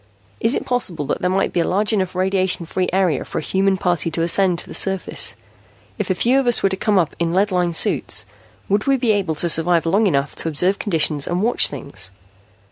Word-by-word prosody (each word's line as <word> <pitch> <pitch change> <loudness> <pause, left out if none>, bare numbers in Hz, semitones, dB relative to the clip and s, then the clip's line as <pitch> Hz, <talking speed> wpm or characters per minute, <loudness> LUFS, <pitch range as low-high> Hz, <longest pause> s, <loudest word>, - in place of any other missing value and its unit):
Is 230 - +3
it - - -3
possible 190 -12 -1
that - - -3
there 180 - 0
might 190 +1 0
be - - 0
a - - +2
large 205 +4 +1
enough 185 -3 -1
radiation 185 -1 0
free 180 +2 -2
area 180 -6 0
for - - -7
a - - -1
human 190 +2 0
party 175 -3 -1
to 165 0 -2
ascend 180 +1 +2
to - - -6
the - - -9
surface? 190 -1 0 0.6
If 210 - -3
a 185 - +1
few 250 +8 +2
of 270 - -2
us 240 - +3
were 195 - +3
to 190 - -2
come 205 +1 0
up 170 -5 0
in 170 0 -1
lead 200 +2 +1
lined 175 -2 0
suits, - - +2 0.4
would 205 +4 0
we 275 0 +3
be 240 -3 +1
able 190 -6 -1
to 170 - -2
survive 170 +1 +2
long 200 +6 +2
enough 140 -5 -1
to - - -2
observe 180 +5 +1
conditions 155 -6 +1
and 175 +3 -1
watch 240 +2 +4
things?" 95 -9 -6
185 Hz, 230 wpm, -19 LUFS, 165-200 Hz, 0.6 s, watch